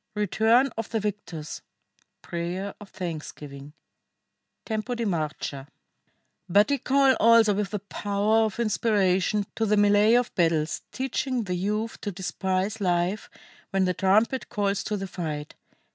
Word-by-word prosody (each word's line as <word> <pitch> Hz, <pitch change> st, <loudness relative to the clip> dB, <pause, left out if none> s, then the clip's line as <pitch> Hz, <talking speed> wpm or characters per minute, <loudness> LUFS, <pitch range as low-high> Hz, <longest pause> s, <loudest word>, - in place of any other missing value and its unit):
RETURN 225 Hz, +5 st, +3 dB
OF 225 Hz, -, -4 dB
THE 225 Hz, -, -1 dB
VICTORS. 195 Hz, -7 st, -5 dB, 0.6 s
PRAYER 175 Hz, +4 st, -4 dB
OF 205 Hz, -, -11 dB
THANKSGIVING: 150 Hz, -4 st, -7 dB, 0.9 s
Tempo 220 Hz, +2 st, -2 dB
di 235 Hz, -1 st, -2 dB
marcia] 155 Hz, -6 st, -3 dB, 0.8 s
"But 205 Hz, +8 st, +4 dB
ye 280 Hz, -, +1 dB
call 270 Hz, 0 st, +4 dB
also 230 Hz, -2 st, +6 dB
with 200 Hz, 0 st, -1 dB
the 210 Hz, -, -2 dB
power 205 Hz, +2 st, +1 dB
of 215 Hz, +1 st, -4 dB
inspiration 205 Hz, -3 st, +1 dB
to 225 Hz, -, 0 dB
the 210 Hz, -, +3 dB
mêlée 205 Hz, +3 st, +5 dB
of 245 Hz, -, -4 dB
battles, 165 Hz, -3 st, +1 dB
teaching 260 Hz, -1 st, -2 dB
the 185 Hz, -3 st, -3 dB
youth 210 Hz, +5 st, -2 dB
to 205 Hz, -, -3 dB
despise 190 Hz, +3 st, -2 dB
life 180 Hz, +2 st, 0 dB, 0.4 s
when 195 Hz, -1 st, +1 dB
the 180 Hz, -, +1 dB
trumpet 215 Hz, +8 st, +2 dB
calls 200 Hz, -3 st, -1 dB
to 210 Hz, -, -1 dB
the 195 Hz, -, -4 dB
fight. 155 Hz, -5 st, -5 dB
205 Hz, 140 wpm, -26 LUFS, 180-220 Hz, 0.9 s, also